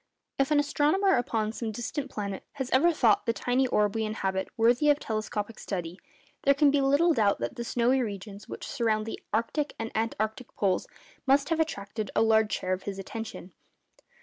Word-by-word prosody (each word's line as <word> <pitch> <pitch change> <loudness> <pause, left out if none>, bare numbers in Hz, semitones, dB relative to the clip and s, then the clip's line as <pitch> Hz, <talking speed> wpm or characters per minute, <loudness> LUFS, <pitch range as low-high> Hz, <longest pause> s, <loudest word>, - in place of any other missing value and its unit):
_ - - -46 0.4
If 275 - +1
an 300 -1 +4
astronomer 300 +7 +2
upon 225 -3 0
some 225 -1 -4
distant 250 +5 -4
planet 200 -5 -4
has 265 -3 -4
ever 315 +7 +5
thought 235 -10 +3
the 230 - +3
tiny 250 +3 +1
orb 210 -4 +2
we 225 - -1
inhabit 190 -3 -2
worthy 240 +6 +4
of 290 - +5
telescopic 215 -2 -4
study, 175 -2 -5 0.4
there 280 0 +4
can 285 0 +5
be 285 0 +2
little 285 +5 +4
doubt 210 -6 +2
that 120 0 -4
the 235 - -4
snowy 245 +3 +2
regions 205 -2 -6
which - - -6
surround 220 -4 0
the 225 - -5
arctic 235 +7 -1
and 225 0 -4
antarctic 220 +1 -2
poles 190 -3 0 0.4
must 275 +1 +4
have 330 -1 +1
attracted 215 -9 -2
a - - +4
large 220 -1 +3
share 185 0 -1
of 185 - -3
his 195 - -6
attention. 195 -2 -7
225 Hz, 190 wpm, -28 LUFS, 210-275 Hz, 0.4 s, ever